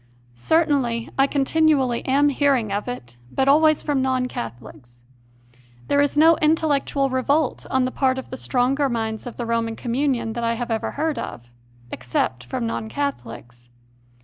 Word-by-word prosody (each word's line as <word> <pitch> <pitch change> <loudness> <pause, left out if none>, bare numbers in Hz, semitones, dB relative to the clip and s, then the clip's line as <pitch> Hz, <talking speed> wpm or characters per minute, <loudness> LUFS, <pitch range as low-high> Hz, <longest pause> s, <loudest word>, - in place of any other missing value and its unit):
Certainly 250 - 0
I 270 0 +3
continually 275 -3 +2
am 285 +2 +4
hearing 270 -6 +1
of 205 +3 -2
it, 120 - -7
but 265 - 0
always 310 +2 +4
from 285 -3 0
non 260 -1 0
Catholics. 120 - -9 0.9
There 285 - +3
is 285 +1 0
no 325 +2 +6
intellectual 295 -3 +1
revolt 275 +3 0
on 260 -1 +2
the 255 - -2
part 260 -1 +1
of 265 - -7
the - - -4
stronger 270 +3 +1
minds 225 -1 -3
of 240 - -7
the 240 - -4
Roman 230 -1 -1
communion 240 -2 -1
that 235 +1 -4
I 230 0 +1
have 240 0 -4
ever 220 - -1
heard 300 -3 -1
of - - -6 0.5
except 125 0 -2
from 125 -1 -3
non 115 -1 -3
Catholics. 120 -2 -5
255 Hz, 160 wpm, -22 LUFS, 220-285 Hz, 0.9 s, no